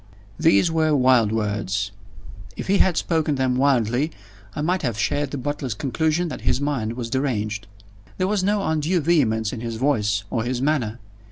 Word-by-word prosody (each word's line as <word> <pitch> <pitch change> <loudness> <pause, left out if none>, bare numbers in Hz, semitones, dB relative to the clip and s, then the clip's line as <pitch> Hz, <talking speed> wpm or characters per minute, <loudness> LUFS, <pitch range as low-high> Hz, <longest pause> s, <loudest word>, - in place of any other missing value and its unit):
These 100 - +4
were 160 -2 +2
wild 125 -5 +4
words. 100 -2 -1 0.7
If - - -4
he 195 +1 +2
had 180 -4 +3
spoken 160 -3 +1
them 130 -1 +1
wildly, 130 +1 +2 0.5
I - - -2
might 180 +4 0
have 120 -7 -2
shared 145 +5 0
the 140 - -4
butler's 135 -3 -3
conclusion 160 +7 0
that - - -6
his - - +1
mind 135 -6 -1
was 120 -1 -5
deranged. 110 -6 -1 0.5
There 185 - +1
was 200 -1 0
no 205 +1 +1
undue 160 +3 +1
vehemence 120 -9 +2
in 115 - -5
his 115 -1 -4
voice 105 -6 +1
or 115 -3 0
his 125 +1 -2
manner. 130 -6 0
130 Hz, 175 wpm, -23 LUFS, 110-155 Hz, 0.7 s, These